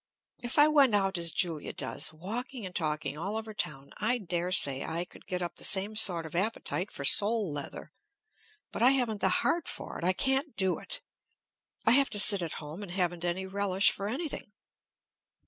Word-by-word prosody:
If 240 +3 -5
I 295 +1 +6
went 280 -7 +3
out 195 -3 0
as 170 -1 +1
Julia 165 -2 -3
does, 145 - +1
walking 225 - -6
and 180 - -9
talking 150 -2 -3
all 200 +6 -4
over 220 0 -7
town, 140 -8 -6
I 225 +4 0
daresay 175 - +1
I 170 +2 -4
could - - -19
get 180 -2 -3
up 175 -1 -5
the - - -6
same 200 +2 +6
sort 180 -6 +3
of 160 - -10
appetite 195 0 -1
for 140 - -5
sole 205 -1 +4
leather. 145 -1 -8 0.8
But - - -6
I 245 - +7
haven't 235 -6 -2
the 190 - +3
heart 335 - -1
for - - -8
it. - - -9
I 185 +2 +2
can't 265 - -1
do 190 -2 0
it. - - -7 0.8
I 225 - +4
have 275 +2 +4
to 210 - +3
sit 200 -1 +7
at 165 -2 -4
home 155 +5 -9
and 190 -4 -9
haven't 175 -2 -2
any 175 +2 -2
relish 195 0 +2
for 200 - -6
anything. 280 -3 -6
190 Hz, 195 wpm, -28 LUFS, 170-225 Hz, 0.8 s, I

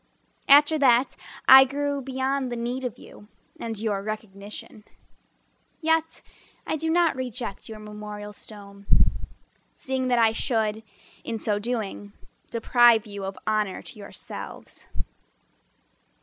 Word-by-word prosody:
After 295 +2 +7
that 255 -1 +4 0.3
I 265 0 +11
grew 285 +1 -2
beyond 265 0 -1
the - - -2
need 240 +2 -3
of 245 -1 -4
you 205 - -14 0.3
And 225 -1 -4
your 205 -2 -1
recognition. 210 0 -7 1.0
Yet 320 0 +1 0.4
I - - -1
do 320 +1 -2
not 340 0 +3
reject 245 -6 -5
your 220 - -7
memorial 210 -1 -8
stone 200 -1 -11 0.9
Seeing 260 -1 -2
that 245 -1 +3
I 225 -1 +5
should, 220 -2 -1 0.4
in 230 - -3
so 210 -1 0
doing, 205 -3 -4 0.4
Deprive 235 -1 +5
you 200 -2 -7
of 195 0 -5
honor 215 -3 0
to 215 - -11
yourselves. 200 - -9
230 Hz, 120 wpm, -26 LUFS, 210-265 Hz, 1.0 s, I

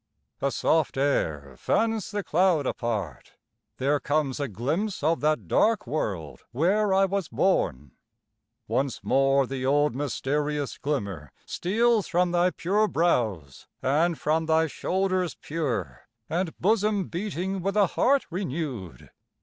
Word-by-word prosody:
A 140 - +2
soft 155 +3 +1
air 75 - 0
fans 225 -3 0
the 205 -1 -3
cloud 175 -4 +2
apart; 105 - -3 0.4
there 145 +2 +1
comes 145 -3 -1
A 140 - -1
glimpse 145 - -2
of 160 +2 +2
that 155 +1 0
dark 220 -1 +2
world 90 - -3
where 190 - +2
I 195 +1 +4
was 195 -3 -2
born. 75 - 0 0.8
Once 135 -1 -1
more 135 0 +3
the 130 0 -5
old 145 +1 +2
mysterious 145 +2 -2
glimmer 100 - -3
steals 225 +3 +1
From 175 +1 +1
thy 175 +1 +3
pure 205 +5 +1
brows, 110 - -1 0.2
and 160 +5 +2
from 160 +1 0
thy 160 0 +3
shoulders 185 +3 -1
pure, 150 -6 -4 0.2
And 170 0 -2
bosom 210 0 +1
beating 190 +1 -3
with 195 +3 -1
a 205 - +6
heart 270 +9 +2
renew'd. 140 - -5
155 Hz, 130 wpm, -26 LUFS, 135-190 Hz, 0.8 s, a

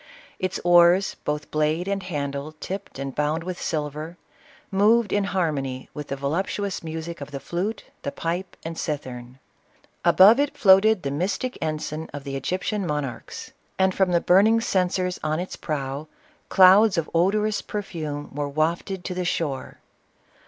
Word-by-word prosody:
Its 185 0 -2
oars, 175 +2 +5
both 150 +1 -3
blade 155 +4 0
and 200 0 -1
handle 145 -4 -4
tipped 190 +4 -7
and 135 0 -4
bound 150 +3 0
with 180 0 -5
silver, 155 +2 -3 0.5
moved 210 +3 +3
in 205 -1 +2
harmony 145 -9 -2
with 150 -1 -6
the 140 - -3
volup 140 +7 -1
tuous 200 -3 -3
music 160 0 -6
of 140 - -6
the 140 -2 -6
flute, 180 - -3 0.2
the 140 - -3
pipe, 175 +4 -4
and 165 0 -5
cithern. 130 -5 -5 0.7
Above 210 +7 +7
it 285 0 0
floated 195 +1 +5
the 140 - -2
mystic 190 - -2
ensign 155 0 -3
of 145 - -6
the 135 -1 -5
Egyptian 185 +7 -2
monarchs; 150 -5 -4 0.3
and 190 0 +3
from 190 -1 +2
the 170 - +4
burning 205 +7 +5
censers 185 -4 0
on 155 +1 0
its 180 - -5
prow, 140 -1 -4 0.4
clouds 190 +1 +7
of 165 - 0
odorous 205 +5 +2
perfume 155 -8 -5
were 145 0 -2
wafted 170 +5 -1
to 185 - -3
the 180 0 -2
shore. 155 -6 -2
170 Hz, 155 wpm, -24 LUFS, 150-190 Hz, 0.7 s, Above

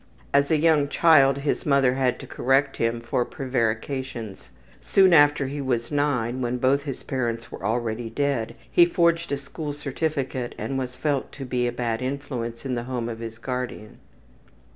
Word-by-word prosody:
As 140 0 +4
a 160 - +3
young 150 -2 +3
child 140 -3 +5
his 140 +1 -1
mother 140 -3 +3
had 130 -1 +1
to - - -8
correct 135 +2 +1
him 115 0 +1
much 115 0 -9
for 120 - +1
prevarications. 120 - -3 0.3
Soon 190 -2 +4
after 145 -2 +5
he 140 +2 -4
was 120 -2 -1
9, 130 -4 0
when 125 0 -1
both 130 +3 +2
his 135 -3 -5
parents 115 -3 -3
were - - -9
already 115 +1 -1
dead, 130 -2 -1 0.2
he 175 - +7
forged 170 -1 +2
a 140 - +1
school 145 +2 -6
certificate 140 -3 -3
and 135 -1 -3
was 125 -1 -4
felt 145 -2 -1
to 135 - -7
be 125 -1 0
a - - -1
bad 120 -1 -2
influence 125 -3 -4
in 130 - -2
the 120 -1 -3
home 120 -2 -3
of 115 -1 -6
his 115 -1 -7
guardian. 125 -3 -5
130 Hz, 180 wpm, -25 LUFS, 120-145 Hz, 0.3 s, he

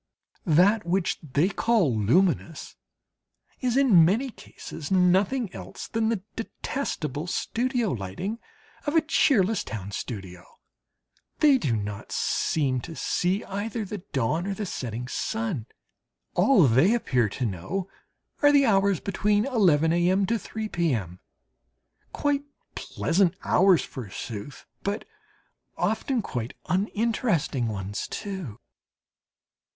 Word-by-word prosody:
That 185 +7 +4
which 175 +1 0
they 150 +3 +1
call 195 - +2
"luminous" 165 - +1 0.8
is, 250 -1 0
in 235 -12 +6
many 225 +10 +2
cases, 160 -8 -9
nothing 190 +4 +2
else 95 +1 -8
than 225 -1 0
the 220 -5 -1
detestable 175 - -4
studio 240 +3 -1
lighting 125 - -4 0.5
of 295 - 0
a 325 - +6
cheerless 225 - +2
town 100 -3 -6
studio. 95 -6 -6 0.9
They 285 -3 +5
do 125 - 0
not 105 -1 -5
seem 135 -5 0
to 165 - -8
see 185 +6 0
either 210 +3 -4
the 205 +1 -5
dawn 150 - 0
or 200 - -2
the 210 - -3
setting 125 - -5
sun; 200 - -3 0.7
all 265 -10 +5
they 140 - +4
appear 125 - +1
to 125 +5 -3
know 110 - -3 0.5
are 290 -1 +6
the 285 -1 +5
hours 200 -4 +3
between 205 +2 +1
11 170 - +3
a.m. 180 +3 +3
to 230 +3 0
3 220 +1 -5
p.m. 115 - -1 0.9
quite 290 -1 0 0.3
pleasant 180 +1 0
hours 185 -2 +4
forsooth, 115 +1 -7 0.2
but 200 +2 -3 0.7
often 255 -6 0
quite 120 - -4
uninteresting 195 - 0
ones 100 -1 -4
too! 190 - -6
185 Hz, 115 wpm, -26 LUFS, -, 0.9 s, in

